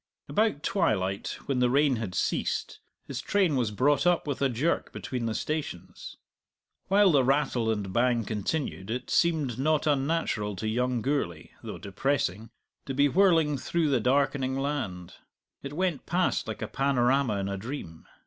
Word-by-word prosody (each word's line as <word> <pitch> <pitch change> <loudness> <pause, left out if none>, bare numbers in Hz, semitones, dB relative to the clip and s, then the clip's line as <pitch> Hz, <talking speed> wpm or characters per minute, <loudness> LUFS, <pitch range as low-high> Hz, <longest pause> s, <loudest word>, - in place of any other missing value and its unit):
About 210 -9 +1
twilight, 100 - 0
when 135 -2 0
the 125 -1 +3
rain 140 0 +3
had 105 -5 -4
ceased, - - -1 0.3
his - - -5
train 190 -7 +2
was 120 -5 +1
brought 140 - +2
up 175 -1 +2
with 140 -2 -3
a 135 - +3
jerk 135 +8 -1
between 125 -3 -4
the 110 - -2
stations. 150 - -5 0.7
While 195 0 +5
the 140 -4 +4
rattle 130 -4 +1
and 105 -4 -2
bang 120 -2 +2
continued 105 - -3
it 125 +3 -4
seemed 150 -8 +1
not 155 +2 +2
unnatural 140 -8 0
to 110 - -4
young 125 +1 0
Gourlay 130 - -2
(though - - -7
depressing) 110 0 -2 0.4
to 135 - -3
be 145 +1 +4
whirling 165 -5 +3
through 165 +2 0
the 130 - +3
darkening 135 +1 +1
land; 130 -12 -3 0.4
it 140 +1 -7
went 175 -4 -1
past 180 +1 0
like - - -5
a - - -3
panorama 135 -3 +1
in 100 0 -2
a 100 - -2
dream. 95 - -7
135 Hz, 160 wpm, -28 LUFS, 110-150 Hz, 0.7 s, While